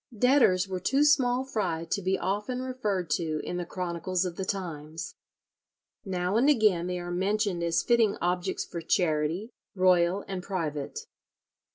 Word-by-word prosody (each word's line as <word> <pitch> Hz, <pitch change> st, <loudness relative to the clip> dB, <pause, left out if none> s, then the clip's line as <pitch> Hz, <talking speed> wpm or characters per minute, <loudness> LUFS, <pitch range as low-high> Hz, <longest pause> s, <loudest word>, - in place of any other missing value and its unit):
Debtors 220 Hz, -7 st, +4 dB
were 185 Hz, -1 st, -3 dB
too 270 Hz, +10 st, +2 dB
small 260 Hz, -4 st, +3 dB
fry 180 Hz, -10 st, -2 dB
to 200 Hz, +4 st, -2 dB
be 190 Hz, +1 st, +1 dB
often 210 Hz, +7 st, -2 dB
referred 215 Hz, -9 st, -2 dB
to 155 Hz, 0 st, -1 dB
in 175 Hz, -, -4 dB
the 175 Hz, -1 st, -4 dB
chronicles 180 Hz, 0 st, -2 dB
of 175 Hz, -2 st, -4 dB
the 190 Hz, -, -3 dB
times. 165 Hz, -5 st, -5 dB, 0.9 s
Now 185 Hz, +1 st, -1 dB
and 265 Hz, +5 st, +4 dB
again 210 Hz, -, +3 dB
they 180 Hz, 0 st, -2 dB
are 175 Hz, 0 st, -5 dB
mentioned 195 Hz, 0 st, 0 dB
as 170 Hz, -1 st, +1 dB
fitting 230 Hz, -4 st, +3 dB
objects 180 Hz, 0 st, -1 dB
for 170 Hz, -, -6 dB
charity, 165 Hz, +5 st, 0 dB, 0.2 s
royal 185 Hz, 0 st, +3 dB
and 190 Hz, -2 st, -4 dB
private. 165 Hz, -, -3 dB
185 Hz, 155 wpm, -28 LUFS, 170-210 Hz, 0.9 s, Debtors